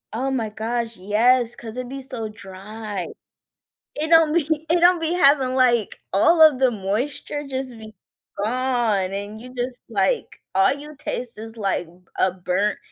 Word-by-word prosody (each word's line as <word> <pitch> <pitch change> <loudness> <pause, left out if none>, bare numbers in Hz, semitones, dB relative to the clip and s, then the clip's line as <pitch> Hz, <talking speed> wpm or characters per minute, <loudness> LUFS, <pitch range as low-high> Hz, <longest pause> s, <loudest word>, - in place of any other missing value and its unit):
Oh 260 +4 -1
my 235 -5 -1
gosh, 230 +2 -3
yes, 230 +5 +2
'cause 225 -1 -9
it 255 0 -5
be 275 - -6
so 245 -5 -5
dry. 205 -1 -7 0.9
It 310 +2 -2
don't 325 -1 +6
be 325 -4 +2 0.2
it 340 +1 +3
don't 350 0 +5
be 330 +2 0
having, 275 -6 +4
like 240 -5 +2
all 320 - +5
of 305 -4 +7
the 260 -1 +4
moisture 240 +8 -3
just 260 -1 -3
be 220 -2 -11 0.4
gone, 230 -3 0
and 205 +2 -5
you 250 +1 -11
just, 245 0 -4
like, 195 -4 -1
all 190 0 +4
you 295 +2 -8
taste 245 -6 -5
is, 225 +1 -9
like, 195 -4 -1 0.3
a 190 - +3
burnt 185 +3 -1
240 Hz, 165 wpm, -22 LUFS, 210-270 Hz, 0.9 s, of